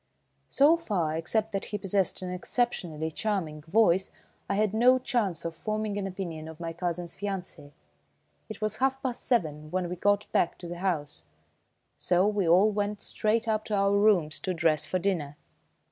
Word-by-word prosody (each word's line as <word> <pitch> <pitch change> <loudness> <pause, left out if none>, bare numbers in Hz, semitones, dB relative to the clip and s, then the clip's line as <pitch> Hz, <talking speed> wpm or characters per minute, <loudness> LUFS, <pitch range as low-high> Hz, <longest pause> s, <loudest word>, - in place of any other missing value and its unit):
So 295 +5 +5
far, 180 - -1
except 215 +7 -1
that 195 - -3
he 210 - -4
possessed 195 -1 -1
an 180 - -4
exceptionally 180 -6 -1
charming 165 -6 -2
voice, 190 +2 +3 0.4
I 200 - +1
had 210 0 +1
no 245 +3 +5
chance 220 - -1
of 165 -1 -4
forming 215 +3 -2
an 200 -1 -2
opinion 170 -5 -6
of 160 0 -10
my 165 -1 -4
cousin's 175 0 -3
fiancé. 190 -7 -5 0.8
It - - -8
was 215 0 -1
half 265 0 +1
past 250 -3 -2
seven 155 - 0
when 180 +1 -2
we 180 - -3
got 205 +3 +2
back 170 - +1
to 175 - -8
the 175 0 -6
house, 150 - -2 0.7
so 180 +2 +2
we 205 -5 +1
all 190 +6 +5
went 205 0 -2
straight 225 +2 0
up 215 -1 +1
to 210 - -1
our 200 0 +3
rooms 200 -7 +3
to 185 -1 -2
dress 165 -2 +2
for 185 - 0
dinner. 170 -6 -1
190 Hz, 175 wpm, -28 LUFS, 170-215 Hz, 0.8 s, So